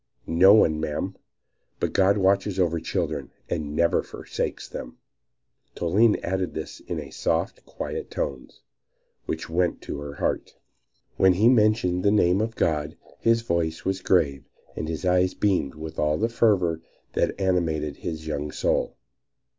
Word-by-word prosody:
"No 95 Hz, +5 st, +6 dB
one, 80 Hz, -7 st, +4 dB
madam; 75 Hz, -1 st, -3 dB, 0.6 s
but -, -, -1 dB
God 100 Hz, +2 st, +4 dB
watches 95 Hz, 0 st, +2 dB
over 85 Hz, -2 st, +2 dB
children -, -, -3 dB, 0.2 s
and 75 Hz, -3 st, -3 dB
never 85 Hz, +1 st, +3 dB
forsakes -, -, -5 dB
them." -, -, -8 dB, 0.8 s
Toline 105 Hz, +6 st, +3 dB
said 95 Hz, 0 st, -2 dB
this 80 Hz, -2 st, -6 dB
in -, -, -6 dB
soft, -, -, -1 dB
quiet -, -, -5 dB
tones, 65 Hz, -2 st, -5 dB, 0.7 s
which 80 Hz, -, -3 dB
went 85 Hz, +1 st, 0 dB
to 70 Hz, -, -5 dB
the 70 Hz, -1 st, -7 dB
heart. -, -, -2 dB, 0.6 s
When 95 Hz, -1 st, +5 dB
he 105 Hz, +6 st, +3 dB
mentioned 105 Hz, -6 st, +3 dB
the 100 Hz, -, +4 dB
name 95 Hz, -2 st, +3 dB
of 115 Hz, +1 st, -2 dB
God 75 Hz, -2 st, -1 dB, 0.2 s
his 115 Hz, 0 st, +2 dB
voice 85 Hz, -5 st, -1 dB
was 95 Hz, 0 st, -1 dB
grave 70 Hz, -8 st, +1 dB, 0.3 s
and 80 Hz, -, -4 dB
his 80 Hz, +3 st, -4 dB
eyes 90 Hz, 0 st, +2 dB
beamed 90 Hz, -9 st, 0 dB
with 80 Hz, +1 st, -7 dB
all 75 Hz, 0 st, +2 dB
the 115 Hz, +2 st, 0 dB
fervor 95 Hz, -8 st, +2 dB, 0.3 s
that -, -, 0 dB
animated 80 Hz, -6 st, 0 dB
his 80 Hz, -1 st, -5 dB
young 75 Hz, -1 st, -3 dB
soul. -, -, -1 dB
90 Hz, 145 wpm, -25 LUFS, 80-95 Hz, 0.8 s, No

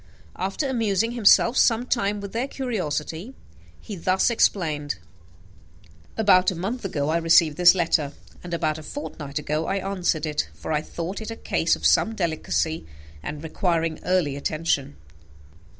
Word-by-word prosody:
After 195 Hz, +10 st, -2 dB
amusing 225 Hz, -3 st, 0 dB
himself 235 Hz, +1 st, +5 dB
some 235 Hz, +1 st, +3 dB
time 205 Hz, -5 st, 0 dB
with 200 Hz, -1 st, -7 dB
their 240 Hz, +4 st, -1 dB
curiosity, 200 Hz, -, -4 dB, 0.5 s
he 210 Hz, -, -7 dB
thus 185 Hz, +5 st, +1 dB
explained: 155 Hz, -10 st, +1 dB, 1.2 s
"About 185 Hz, -4 st, +5 dB
a 185 Hz, -, -3 dB
month 205 Hz, +9 st, -4 dB
ago 150 Hz, -7 st, -2 dB
I 165 Hz, -, +2 dB
received 165 Hz, -2 st, +4 dB
this 180 Hz, +2 st, +7 dB
letter, 160 Hz, -5 st, +1 dB, 0.3 s
and 175 Hz, -, -8 dB
about 155 Hz, -2 st, -1 dB
a -, -, -9 dB
fortnight 150 Hz, -, -6 dB
ago 150 Hz, +2 st, -2 dB
I -, -, 0 dB
answered 185 Hz, -5 st, -1 dB
it; 150 Hz, -, -2 dB
for 80 Hz, -, -6 dB
I 150 Hz, -1 st, +1 dB
thought 170 Hz, +6 st, -5 dB
it 220 Hz, -, -6 dB
a 225 Hz, -, -5 dB
case -, -, +1 dB
of -, -, -8 dB
some 225 Hz, -, +3 dB
delicacy, 160 Hz, -, -1 dB, 0.3 s
and 150 Hz, -, -6 dB
requiring 165 Hz, -1 st, -1 dB
early 180 Hz, -7 st, +1 dB
attention. 145 Hz, -1 st, -1 dB
175 Hz, 150 wpm, -24 LUFS, 155-205 Hz, 1.2 s, this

